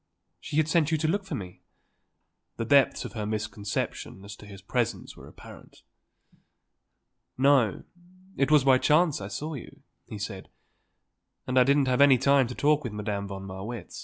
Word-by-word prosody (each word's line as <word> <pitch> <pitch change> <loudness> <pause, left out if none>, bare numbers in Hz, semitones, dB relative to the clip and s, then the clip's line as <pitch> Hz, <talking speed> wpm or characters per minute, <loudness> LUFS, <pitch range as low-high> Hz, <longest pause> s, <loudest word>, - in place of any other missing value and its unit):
She 165 -3 -5
had 155 -1 +3
sent 160 -2 +2
you 160 - +1
to 155 +1 -1
look 195 +4 -1
for - - -5
me?" 90 -3 -8 1.0
The 115 - -3
depths 140 +1 +3
of - - -8
her 105 -3 -4
misconception 105 -2 -4
as 100 0 -9
to 105 - -14
his 100 -1 -11
presence 120 +2 -2
were - - -13
apparent. - - -15 1.5
"No; 130 -6 +3 0.5
it 135 - +1
was 150 -3 +5
by 130 -1 +5
chance 155 - +2
I 100 - -5
saw 150 +10 -5
you," 140 +1 -10 0.2
he 110 - -7
said. 100 -2 -7 1.0
"And 130 0 +2
I - - +7
didn't 140 +2 +3
have 125 +1 +2
any 140 -2 +7
talk 140 +3 +2
with 120 -5 -5
Madame 105 -1 -4
von 95 -1 -7
Marwitz." 100 +5 -7
125 Hz, 165 wpm, -27 LUFS, 105-145 Hz, 1.5 s, I